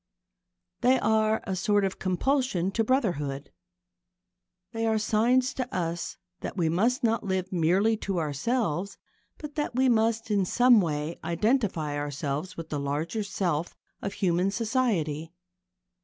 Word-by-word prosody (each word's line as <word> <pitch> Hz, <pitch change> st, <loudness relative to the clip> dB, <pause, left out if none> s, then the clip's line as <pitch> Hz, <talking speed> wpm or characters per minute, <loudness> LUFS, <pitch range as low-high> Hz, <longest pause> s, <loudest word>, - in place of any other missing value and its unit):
They 255 Hz, +1 st, +4 dB
are 220 Hz, 0 st, +2 dB
a 190 Hz, -, -3 dB
sort 205 Hz, +2 st, +2 dB
of 190 Hz, -, -3 dB
compulsion 190 Hz, 0 st, 0 dB
to 225 Hz, +3 st, +1 dB
brotherhood. 155 Hz, -, -1 dB, 1.2 s
They 225 Hz, -1 st, -1 dB
are 220 Hz, 0 st, +2 dB
signs 240 Hz, +5 st, +2 dB
to 255 Hz, -1 st, -4 dB
us 170 Hz, -2 st, -3 dB, 0.2 s
that -, -, -6 dB
we 165 Hz, -3 st, +2 dB
must 235 Hz, -, +1 dB
not 230 Hz, 0 st, +2 dB
live 190 Hz, -1 st, -2 dB
merely 185 Hz, +6 st, +3 dB
to 195 Hz, -3 st, -3 dB
ourselves, 175 Hz, -, -1 dB, 0.4 s
but 300 Hz, -1 st, -8 dB
that 295 Hz, -5 st, -2 dB
we 260 Hz, 0 st, +3 dB
must 225 Hz, -1 st, +1 dB
in 200 Hz, -2 st, +3 dB
some 245 Hz, +4 st, +5 dB
way 155 Hz, -1 st, -3 dB
identify 170 Hz, -, 0 dB
ourselves 145 Hz, +3 st, -3 dB
with 165 Hz, -1 st, -7 dB
the 145 Hz, -, -2 dB
larger 150 Hz, +9 st, -2 dB
self 175 Hz, -5 st, -2 dB, 0.3 s
of 200 Hz, -, -3 dB
human 180 Hz, 0 st, +1 dB
society. 195 Hz, -, -1 dB
195 Hz, 140 wpm, -27 LUFS, 165-230 Hz, 1.2 s, some